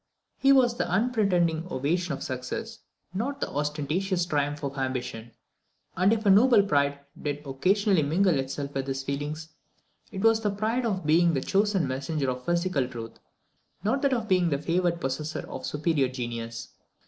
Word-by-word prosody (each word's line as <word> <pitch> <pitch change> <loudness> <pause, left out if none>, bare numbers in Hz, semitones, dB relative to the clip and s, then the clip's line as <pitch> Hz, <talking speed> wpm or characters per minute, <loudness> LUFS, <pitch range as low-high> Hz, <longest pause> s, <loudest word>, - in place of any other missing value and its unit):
His 275 0 +6
was 245 -3 +3
the 175 - -1
unpretending 180 -6 +1
ovation 170 +6 -1
of 140 - -4
success, 220 - -5 0.3
not 260 +9 -2
the - - -1
ostentatious 155 +6 -1
triumph 145 -3 -1
of 140 0 -3
ambition; 125 -4 -3 0.7
and 185 +3 +3
if 220 -1 0
a 200 - +6
noble 220 +1 +6
pride 140 -6 +1 0.2
did 145 0 -3
occasionally 185 +7 +2
mingle 165 +2 +2
itself 140 +1 -4
with 135 0 -3
his 135 0 -3
feelings, 145 +3 -4 0.6
it 190 -2 -5
was 225 0 +5
the 210 - +1
pride 220 +5 -1
of 190 -6 -2
being 165 +2 +4
the 135 - 0
chosen 195 -4 +1
messenger 135 +1 -1
of 125 0 -6
physical 170 -6 +1
truth, 115 -3 -8 0.6
not 240 +7 +1
that 280 -2 +2
of 230 -3 -1
being 180 -3 +3
the 140 - +1
favoured 170 +3 0
possessor 150 +2 -3
of - - -6
superior 150 -2 +1
genius. 120 -2 -5
165 Hz, 165 wpm, -27 LUFS, 140-200 Hz, 0.7 s, His